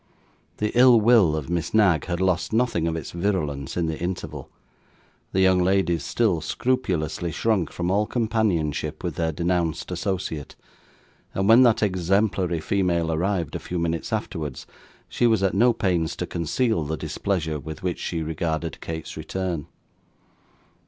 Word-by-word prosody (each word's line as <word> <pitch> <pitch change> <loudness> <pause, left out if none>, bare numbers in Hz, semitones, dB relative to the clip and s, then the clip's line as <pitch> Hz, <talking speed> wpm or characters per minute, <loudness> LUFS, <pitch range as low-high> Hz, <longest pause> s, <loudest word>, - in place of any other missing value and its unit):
The 105 0 -1
ill 125 -1 +7
will 105 -8 +5
of 75 -3 -4
Miss 85 +3 -2
Knag 95 -7 +4
had 85 -1 -2
lost 95 -1 +1
nothing 115 -8 +1
of 80 - -1
its 80 - -5
virulence 85 -8 -2
in 85 - +1
the 80 -1 -3
interval. 80 -6 -4 0.8
The 95 - +1
young 95 -1 +4
ladies 90 -4 +1
still 95 - +1
scrupulously 85 -10 -1
shrunk 105 -2 0
from 90 +1 -2
all 105 +2 +2
companionship 110 - -1
with - - -2
their 80 -1 -1
denounced 85 0 -1
associate; 90 -5 -3 0.8
and 95 0 0
when 115 +3 +8
that 120 -4 +4
exemplary 95 -2 +1
female 85 -1 0
arrived 85 -1 -1
a - - -2
few 90 - -5
minutes 85 -1 -2
afterwards, 75 -4 -4 0.4
she 120 - +1
was 110 -4 +2
at 95 - +2
no 120 +6 +5
pains 90 -7 0
to - - -3
conceal 85 - 0
the 80 +2 -3
displeasure 80 0 -2
with 80 +4 -8
which 90 -2 -2
she 85 -2 -3
regarded 80 +1 -3
Kate's 80 -1 -6
return. 85 0 -4
90 Hz, 150 wpm, -24 LUFS, 80-100 Hz, 0.8 s, when